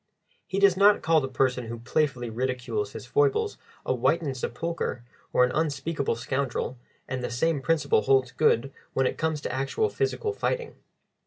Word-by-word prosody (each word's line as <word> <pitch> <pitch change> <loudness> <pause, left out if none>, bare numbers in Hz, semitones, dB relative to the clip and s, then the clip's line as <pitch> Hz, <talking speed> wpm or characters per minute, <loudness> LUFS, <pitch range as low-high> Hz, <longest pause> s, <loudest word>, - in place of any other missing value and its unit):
He 190 - -3
does 200 -2 +5
not 200 +2 +5
call 160 -1 +4
the 135 - -2
person 130 -2 0
who 115 +1 -5
playfully 125 0 -1
ridicules 130 - -2
his - - -7
foibles 435 0 +1 0.3
a - - +1
whitened 155 -5 +1
sepulchre 125 0 -3 0.3
or - - +4
an 125 - +2
unspeakable 150 -3 -1
scoundrel, 130 0 -2 0.3
and 130 -1 -3
the - - -2
same 145 +3 0
principle 155 -7 +2
holds 130 -1 +3
good 135 +4 +2 0.2
when 130 - +2
it - - -1
comes 160 -2 0
to 125 - -4
actual 135 - 0
physical 425 +1 -1
fighting. 475 +2 -2
140 Hz, 165 wpm, -27 LUFS, 125-170 Hz, 0.3 s, does